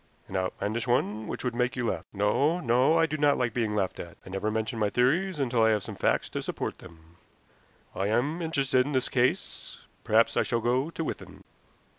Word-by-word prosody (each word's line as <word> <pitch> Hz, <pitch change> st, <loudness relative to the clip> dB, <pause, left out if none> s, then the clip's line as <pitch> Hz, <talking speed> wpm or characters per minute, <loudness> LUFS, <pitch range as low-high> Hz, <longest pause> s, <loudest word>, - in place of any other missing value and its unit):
"An 95 Hz, -, -8 dB
outlandish 100 Hz, +5 st, -2 dB
one 110 Hz, -3 st, 0 dB
which -, -, -5 dB
would 125 Hz, -2 st, -1 dB
make 125 Hz, +1 st, 0 dB
you 125 Hz, -2 st, -2 dB
laugh. -, -, -5 dB
No, 135 Hz, -, +1 dB
no; 130 Hz, +2 st, +3 dB
I 165 Hz, -, +4 dB
do 155 Hz, -1 st, -3 dB
not 145 Hz, -1 st, +3 dB
like 120 Hz, -3 st, 0 dB
being 110 Hz, -3 st, -1 dB
laughed 95 Hz, -3 st, -1 dB
at. 85 Hz, -, -8 dB
I -, -, -10 dB
never 95 Hz, +3 st, -1 dB
mention 110 Hz, +2 st, -2 dB
my 105 Hz, -1 st, +2 dB
theories 155 Hz, -, +1 dB
until 125 Hz, -4 st, +1 dB
I 110 Hz, -, +5 dB
have 105 Hz, -3 st, +1 dB
some -, -, -7 dB
facts -, -, +1 dB
to -, -, -4 dB
support -, -, -4 dB
them. 80 Hz, 0 st, -16 dB, 0.8 s
I 95 Hz, -, -1 dB
am 135 Hz, +10 st, 0 dB
interested 135 Hz, -5 st, +2 dB
in 145 Hz, +3 st, -4 dB
this 130 Hz, -1 st, 0 dB
case. 125 Hz, 0 st, -1 dB, 0.3 s
Perhaps 110 Hz, +2 st, +3 dB
I -, -, +5 dB
shall 120 Hz, -, 0 dB
go 125 Hz, +6 st, +1 dB
to 165 Hz, -, -4 dB
Withan." -, -, -7 dB
120 Hz, 210 wpm, -28 LUFS, 105-140 Hz, 0.8 s, I